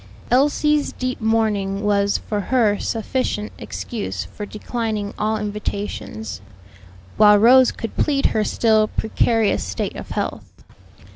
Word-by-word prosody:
Elsie's 295 +3 +2
deep 255 -1 -4
mourning 210 -3 0
was 200 -1 +2
for 210 - -4
her 225 -6 +3
sufficient 225 -2 -2
excuse 225 -4 -5
for 210 - -8
declining 215 -1 -3
all 215 +1 0
invitations; 205 - -5 0.8
while 210 -1 +7
Rose 250 +4 +6
could 225 - -7
plead 280 -2 +1
her 215 - +2
still 215 0 +2
precarious 220 0 +1
state - - -4
of - - -8
health. - - -5
215 Hz, 120 wpm, -21 LUFS, 205-235 Hz, 0.8 s, while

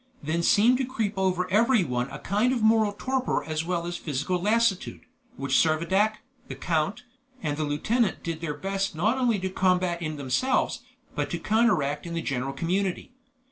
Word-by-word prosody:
Then 160 +3 -1
seemed 230 +8 +4
to - - +1
creep 230 -5 -2
over 185 -1 0
everyone 190 - +2
a 135 - -7
kind 210 +10 +1
of 240 -4 -1
moral 220 -1 +4
torpor 260 +4 -1
as 155 0 -2
well 170 0 -2
as 175 0 -4
physical 155 +5 -2
lassitude, 220 -1 +1 0.4
which 140 - -3
Servadac, 190 +7 +1 0.2
the - - -6
count, 170 +8 -1 0.4
and 145 -1 -1
the 155 0 -2
lieutenant 215 +10 0
did 165 -1 -4
their 150 -3 -3
best 195 +2 -2
not 220 +11 +1
only 240 -4 +2
to 190 0 -3
combat 180 -2 +1
in 155 -2 -3
themselves, 145 - 0 0.3
but - - -2
to - - -2
counteract 180 -10 +1
in 170 - -5
the 165 - -2
general 135 -1 -2
community. 180 - -2
185 Hz, 175 wpm, -26 LUFS, 155-220 Hz, 0.4 s, seemed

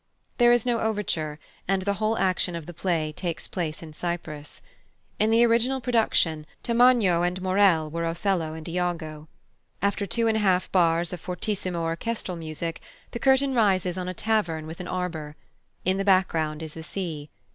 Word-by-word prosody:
There 240 0 +7
is 240 -1 +3
no 240 -2 +1
overture, 180 -9 -1 0.3
and 190 0 +1
the 200 +1 +1
whole 220 +1 +1
action 185 -2 +1
of 165 -2 -6
the 175 - -8
piece 160 -3 -1
takes 170 -4 -4
place 165 -3 -3
in 155 -1 -10
Cyprus. 155 -3 -5 0.6
In 215 - +3
the 230 +1 +5
original 235 +3 +2
production 220 -10 +1 0.2
Tamagno 235 -7 +4
and 180 +1 0
Maurel 185 -4 +3
were 170 +1 -2
Othello 165 -2 -1
and 160 -1 -8
Iago. 165 -3 -3 0.5
After 200 +1 0
two 230 +4 +1
and 220 -1 +2
a - - 0
half 185 -2 +2
bars 170 -2 +3
of 175 - -6
fortissimo 185 -2 -2
orchestral 180 +4 -3
music, 165 0 -5 0.3
the 235 - -5
curtain 270 +1 +3
rises 190 -6 +2
on 180 -1 -4
a 185 - -4
tavern 170 -7 0
with 160 +1 -8
an 180 - -6
arbour. 165 -5 -4 0.5
In 190 +1 +2
the 195 - 0
background 165 -5 +2
is 155 -1 -6
the 165 - -8
sea. 160 -4 -5
180 Hz, 175 wpm, -26 LUFS, 165-210 Hz, 0.6 s, There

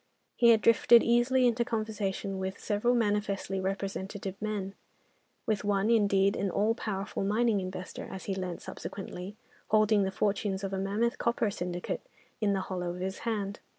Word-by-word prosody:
He 235 - +5
had 225 -2 +6
drifted 230 +1 +6
easily 240 +2 +3
into 240 0 +3
conversation 210 -4 -2
with 190 +1 -3
several 225 +4 +1
manifestly 205 -3 0
representative 195 0 -3
men: 205 -2 -3 0.7
with 215 -2 0
one, 205 +1 +2
indeed, 200 -3 +3
an 200 - -1
all 210 +5 +2
powerful 200 -4 -3
mining 215 +1 +2
investor 185 -1 -6
(as 190 - -7
he 195 - -1
learnt 185 -2 -4
subsequently), 195 0 -7 0.3
holding 215 -1 +4
the 190 - +1
fortunes 200 -1 -1
of 195 0 -3
a 190 - -1
mammoth 210 +5 0
copper 235 -3 +1
syndicate 175 -2 -4 0.4
in 205 -2 +2
the 195 - 0
hollow 180 -2 -3
of - - -8
his 190 +1 -3
hand. 205 -2 -2
200 Hz, 160 wpm, -30 LUFS, 190-220 Hz, 0.7 s, had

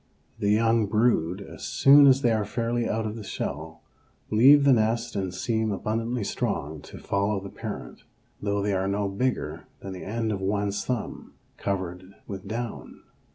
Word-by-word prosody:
The 100 - +1
young 115 0 +3
brood, 105 -4 +1
as - - -11
soon 140 +1 +6
as 135 0 +5
they 120 - +4
are 110 -1 +1
fairly 115 +3 -1
out 110 0 -1
of 110 0 -3
the 110 - -7
shell, 80 -4 -5 0.5
leave 135 +7 +7
the 140 -1 +6
nest 115 0 +1
and 95 -2 -2
seem 110 +3 -1
abundantly 115 +4 -2
strong 75 -5 -3
to - - -11
follow 100 +1 0
the 100 0 -8
parent, - - -7 0.4
though 100 0 0
they 100 0 0
are 95 0 0
no 100 +1 0
bigger 95 -7 -2
than 95 - -6
the 90 - -8
end 110 +2 -2
of 100 -2 -3
one's 100 +1 -1
thumb 125 -4 -4 0.2
covered 95 -1 -4
with 95 -2 -7
down. 115 +1 -6
105 Hz, 170 wpm, -26 LUFS, 95-115 Hz, 0.5 s, leave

